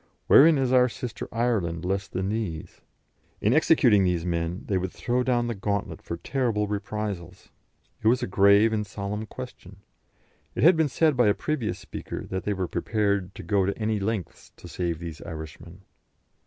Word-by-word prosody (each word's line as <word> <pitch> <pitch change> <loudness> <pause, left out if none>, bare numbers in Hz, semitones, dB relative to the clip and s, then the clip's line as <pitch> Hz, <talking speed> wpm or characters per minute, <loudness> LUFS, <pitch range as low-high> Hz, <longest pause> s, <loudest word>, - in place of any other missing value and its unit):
Wherein 155 +2 +7
is 130 -2 +1
our 125 -1 +5
sister 115 -1 -6
Ireland 100 -8 -1
less 100 +1 -1
than 95 +2 -3
these? 105 -8 -4 0.6
In 105 - +2
executing 130 -9 +4
these 90 -2 0
men, 85 +1 -2
they 95 -2 0
would 90 0 -3
throw 125 +1 -1
down 125 -1 +1
the 120 - -2
gauntlet 100 0 -3
for 85 - -5
terrible 115 -1 -1
reprisals. 100 -3 -5 0.5
It 110 - 0
was 125 +2 +3
a - - +1
grave 100 +3 +4
and 105 -1 0
solemn 105 +1 -5
question. 125 -7 -10 0.8
It - - -1
had 170 +3 +7
been 160 -2 +2
said 155 +3 +2
by 120 -3 +4
a 105 - +3
previous 150 -8 -2
speaker - - -7
that 95 0 -3
they 105 - 0
were 95 -2 -2
prepared 100 -3 -1
to - - -8
go 100 -3 +1
to 100 - -2
any 110 -1 -1
lengths 100 -4 -4
to - - -12
save 85 -2 -2
these 85 -2 -8
Irishmen. 80 -2 -9
105 Hz, 180 wpm, -26 LUFS, 95-120 Hz, 0.8 s, Wherein